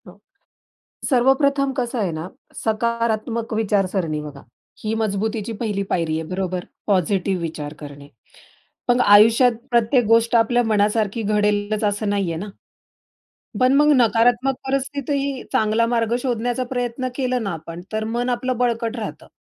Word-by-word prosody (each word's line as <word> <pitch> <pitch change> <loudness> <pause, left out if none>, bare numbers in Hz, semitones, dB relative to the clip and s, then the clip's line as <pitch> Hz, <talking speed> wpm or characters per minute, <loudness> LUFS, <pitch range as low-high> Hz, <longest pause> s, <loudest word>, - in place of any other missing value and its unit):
हां. 180 - -13 0.9
सर्वप्रथम 275 +1 +3
कसं 245 0 -2
आहे 200 -5 0
ना, 160 +3 -5 0.4
सकारात्मक 230 0 -1
विचारसरणी 195 -7 0
बघा. 145 -2 -9 0.4
ही 215 +1 -1
मजबुतीची 215 +1 -2
पहिली 210 -4 -1
पायरी 160 -3 0
आहे - - -3
बरोबर, 185 -1 -3 0.2
पॉझिटिव्ह 190 -1 +1
विचार 150 -3 -5
करणे. 145 -1 -10 0.8
पण 245 +1 +3
आयुष्यात 225 +3 +6 0.2
प्रत्येक 240 +1 +3
गोष्ट 230 +2 +3
आपल्या 240 +2 +3
मनासारखी 215 0 +1
घडेलच 210 0 0
असं 205 +1 0
नाहीये 195 -5 -1
ना. 185 +6 -5 1.1
पण 255 +1 +4
मग 295 +1 +5
नकारात्मक 240 +3 +3
परिस्थितीही 275 0 -2
चांगला 220 +2 +2
मार्ग 230 -1 0
शोधण्याचा 245 0 -1
प्रयत्न 245 +1 -2
केला 255 -2 0
ना 205 -3 -3
आपण, 165 +1 -8
तर 215 0 -1
मन 240 +3 -2
आपलं 250 +1 -1
बळकट 235 -1 0
राहतं. 200 -10 -6
225 Hz, 135 wpm, -21 LUFS, 200-245 Hz, 1.1 s, आयुष्यात